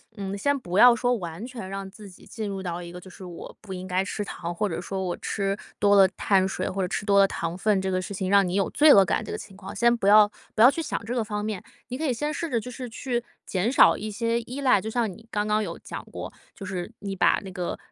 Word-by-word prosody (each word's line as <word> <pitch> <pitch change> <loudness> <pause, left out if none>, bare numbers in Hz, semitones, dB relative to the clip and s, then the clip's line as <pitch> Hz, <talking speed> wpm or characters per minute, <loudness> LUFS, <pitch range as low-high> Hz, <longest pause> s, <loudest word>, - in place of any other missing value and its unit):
嗯， 200 -1 -4
先 285 +7 +1
不 180 -8 -4
要 245 +2 +8
说 245 +2 +1
完 175 0 -6
全 235 -7 -8
让 195 0 -5
自 205 0 -12
己 180 - -16
进 215 -1 -5
入 195 -1 -4
到 175 -1 -4
一 170 - -8
个， 180 +1 -9
就 190 - -13
是 185 0 -11
我 175 -2 -9
不 200 -3 -9
应 185 0 -6
该 185 0 0
吃 205 - -3
糖， 170 -3 -6
或 210 - 0
者 165 - -3
说 190 +2 -4
我 180 -2 -3
吃 195 -1 -2 0.2
多 205 0 +4
了 195 -1 +8
碳 190 -2 +2
水， 185 -1 -3
或 195 +1 -3
者 180 - 0
吃 205 +2 -3
多 200 -1 +4
了 195 - +6
糖 170 -2 -4
分， 195 0 +2
这 190 - -2
个 185 0 0
事 195 - -6
情 190 -1 -3
让 200 -1 +5
你 180 - -3
有 195 - +1
罪 300 -1 +6
恶 195 - +8
感 - - 0
这 - - -9
个 - - -3
情 195 -2 -11
况， 195 -1 -9
先 235 0 +4
不 210 -4 -2
要 210 +1 +7 0.2
不 215 - +2
要 250 +4 +9
去 330 - -3
想 290 - -4
这 235 - -3
个 245 - 0
方 210 -1 -4
面。 210 -3 -3 0.3
你 250 - -4
可 315 - -2
以 260 - +1
先 295 +5 -2
试 330 +2 -3
着 235 -3 0
就 250 - -8
是 250 0 -6
去 240 0 -3 0.2
减 190 +4 0
少 265 - +6
一 215 - -5
些 230 +2 -1
依 250 +4 -7
赖， 255 -6 +4
就 215 - -5
像 225 -2 0
你 225 +5 -14
刚 210 -1 -1
刚 215 0 +1
有 175 -5 -4
讲 - - -7
过， - - -7 0.2
就 195 - -8
是 185 +1 -5
你 200 -1 -5
把 - - +3
那 190 - -8
个， 180 -2 -4
200 Hz, 310 characters per minute, -25 LUFS, 190-230 Hz, 0.3 s, 要